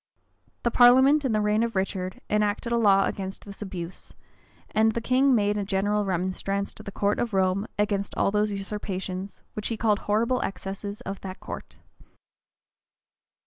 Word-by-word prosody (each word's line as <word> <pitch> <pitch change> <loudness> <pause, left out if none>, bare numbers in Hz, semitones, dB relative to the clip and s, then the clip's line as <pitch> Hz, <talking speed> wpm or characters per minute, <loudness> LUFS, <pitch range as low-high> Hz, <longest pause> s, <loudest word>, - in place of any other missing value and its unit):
The 235 - +2
parliament, 260 +5 +6
in 260 - +1
the 215 -1 +2
reign 210 +1 +2
of 230 -2 -1
Richard, 190 -1 -2
enacted 210 +2 0
a - - +3
law 200 -4 +5
against 190 -1 -5
this 200 0 -10
abuse: 185 -3 -7 0.6
and 220 +1 +3
the 235 - -1
king 255 +3 +3
made 205 -1 +1
a - - -1
general 205 +1 0
remonstrance 190 +2 -2
to - - -11
the 200 - -7
court 205 +1 0
of 230 -4 -1
Rome 190 +2 +1
against 205 -1 0
all - - +2
those 210 0 +1
usurpations, 195 -1 -5
which 210 - -2
he 230 - -2
calls 215 -2 +2
"horrible 230 +5 +1
excesses" 195 +3 -5
of 195 -4 -6
that 185 -1 -7
court. - - -8
205 Hz, 165 wpm, -26 LUFS, 195-220 Hz, 0.6 s, parliament